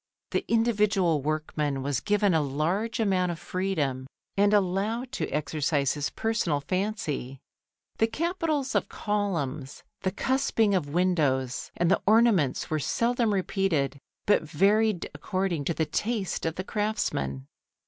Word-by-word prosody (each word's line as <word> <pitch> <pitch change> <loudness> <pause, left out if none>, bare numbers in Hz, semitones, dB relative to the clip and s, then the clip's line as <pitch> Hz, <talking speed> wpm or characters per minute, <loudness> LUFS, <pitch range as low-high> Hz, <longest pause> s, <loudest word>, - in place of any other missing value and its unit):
The - - 0
individual 210 -8 +2
workman 150 -2 -2
was 140 -3 0
given 205 -2 +2
a 160 - +3
large 165 +12 -1
amount 185 -5 +2
of 170 - -5
freedom 160 -8 -2 0.3
and 205 +1 +4
allowed 210 +5 +1
to 265 - -3
exercise 145 -2 0
his 145 -1 -2
personal 220 -10 0
fancy. 150 - -3 0.6
The 225 - +4
capitals 315 -1 -1
of - - 0
columns, 165 - -2 0.2
the 190 - +1
cusping 225 -2 +1
of 170 -7 0
windows, 145 -7 +1
and 175 +1 +2
the - - +3
ornaments 215 - +4
were 155 - -1
seldom 235 - +1
repeated, 180 -8 0 0.3
but 205 - +4
varied 195 +5 +2
according 175 0 -2
to 170 - 0
the 160 - +1
taste 205 +2 -2
of 160 - -2
the 185 - -3
craftsman. 130 - -2
185 Hz, 135 wpm, -27 LUFS, 150-210 Hz, 0.6 s, and